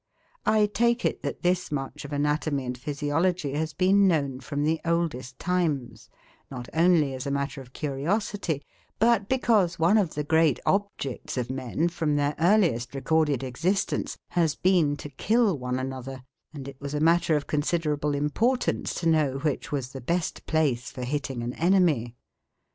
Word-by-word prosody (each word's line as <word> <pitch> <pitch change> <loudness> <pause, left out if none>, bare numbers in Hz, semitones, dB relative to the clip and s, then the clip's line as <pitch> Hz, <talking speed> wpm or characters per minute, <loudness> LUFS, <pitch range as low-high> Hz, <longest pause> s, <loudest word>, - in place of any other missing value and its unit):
I 215 -1 +4
take 235 +3 +1
it - - 0
that - - -5
this 180 -1 +1
much 135 0 -4
of 145 - -8
anatomy 145 -1 0
and 125 0 -3
physiology 145 +4 -1
has 155 +2 -1
been 195 +3 +4
known 140 -7 +1
from 145 +2 -3
the 160 +2 +1
oldest 165 -7 -1
times, 145 -11 -2 0.4
not 125 -2 -7
only 160 -4 +3
as 130 +1 -5
a - - 0
matter 140 0 -2
of 125 -1 -14
curiosity, 155 +3 -2 0.3
but 225 -3 +3
because 215 -9 +2
one 175 +7 +4
of 180 -6 -1
the 150 - -1
great 160 -2 +3
objects 195 -12 -2
of 125 0 -2
men, 130 +5 -1
from 160 -3 -1
their 145 0 +1
earliest 160 - +2
recorded 145 -1 +1
existence, 165 +10 -1
has 165 -4 +1
been 170 -6 +2
to - - -7
kill 215 - +2
one 125 -2 -3
another, 130 0 -5 0.3
and 140 -4 -8
it 135 -1 -10
was 140 +1 -4
a - - 0
matter 165 0 +3
of 145 - -1
considerable 150 -1 0
importance 220 - 0
to 170 - -1
know 150 -5 +2
which 145 0 -2
was 135 -4 -2
the 135 - -7
best 170 +6 -2
place 140 -7 +1
for 125 - -7
hitting 135 -2 -3
an 120 +1 -3
enemy. 165 -10 +2
150 Hz, 165 wpm, -26 LUFS, 135-175 Hz, 0.4 s, I